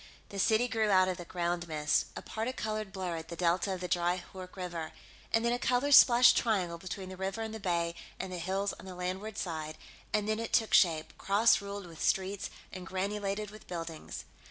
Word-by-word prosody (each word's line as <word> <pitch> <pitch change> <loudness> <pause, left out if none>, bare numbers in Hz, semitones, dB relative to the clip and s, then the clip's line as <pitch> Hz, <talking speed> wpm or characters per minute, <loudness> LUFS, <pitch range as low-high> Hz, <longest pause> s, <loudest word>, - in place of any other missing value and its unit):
The 200 - -6
city 220 +5 +3
grew 225 -3 +1
out 185 -1 +5
of 185 - -2
the 175 - -7
ground 175 0 -2
mist, 150 -2 +1
a - - -6
particolored 220 -3 -3
blur 185 -3 -3
at 160 0 -7
the 170 - -6
delta 180 +3 +1
of 180 - -8
the 180 - -2
dry 175 +1 +1
Hoork 185 -1 -9
River, 175 -4 -5 0.4
and 225 +1 +2
then 235 - +3
a 245 - -1
color 250 +4 +1
splashed 240 -3 +8
triangle 185 -7 +1
between 185 +1 -6
the 185 - -8
river 195 +4 -3
and 220 0 -5
the 220 - -5
bay 170 -4 0 0.3
and 185 - -4
the 180 - -4
hills 195 +3 -1
on - - -11
the 185 - -7
landward 185 +4 -4
side, 155 -3 -4 0.3
and 210 -1 +1
then 215 0 0
it 230 - -4
took 225 -2 +3
shape, 160 -4 +4
cross 205 +3 +4
ruled 200 -1 -6
with 165 -2 -11
streets 190 +1 0 0.2
and 185 -1 -7
granulated 200 +2 -2
with 215 - -13
buildings. 165 -2 -6
190 Hz, 210 wpm, -31 LUFS, 175-215 Hz, 0.4 s, splashed